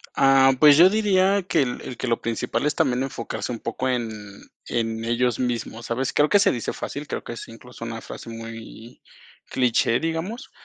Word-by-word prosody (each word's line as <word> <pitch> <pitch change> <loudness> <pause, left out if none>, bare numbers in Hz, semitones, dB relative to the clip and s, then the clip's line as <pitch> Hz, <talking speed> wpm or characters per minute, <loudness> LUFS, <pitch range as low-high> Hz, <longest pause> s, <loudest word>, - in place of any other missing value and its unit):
Ah, 135 0 +5
pues 150 -2 +8
yo 175 +4 +8
diría 200 -2 +3
que 170 -4 +1
el 125 -2 -3
el 125 - -7
que 130 - -4
lo 115 -1 0
principal 115 +5 -2
es 150 - +1
también 125 0 +1
enfocarse 130 -3 -5
un 120 - -4
poco 120 +3 -3
en 120 -3 -1 0.6
en 115 -1 -2
ellos 120 0 +1
mismos, 120 -2 -3
¿sabes? 125 +2 -2
Creo 150 +1 +3
que 205 - +5
se - - +4
dice 120 - -3
fácil, 145 +1 -6
creo - - -4
que - - -6
es 115 - -8
incluso 120 +1 -13
una 115 -1 -6
frase - - -9
muy 115 +1 -9 0.5
cliché, 120 -2 +1
digamos, 165 +8 -4
125 Hz, 190 wpm, -24 LUFS, 115-150 Hz, 0.6 s, pues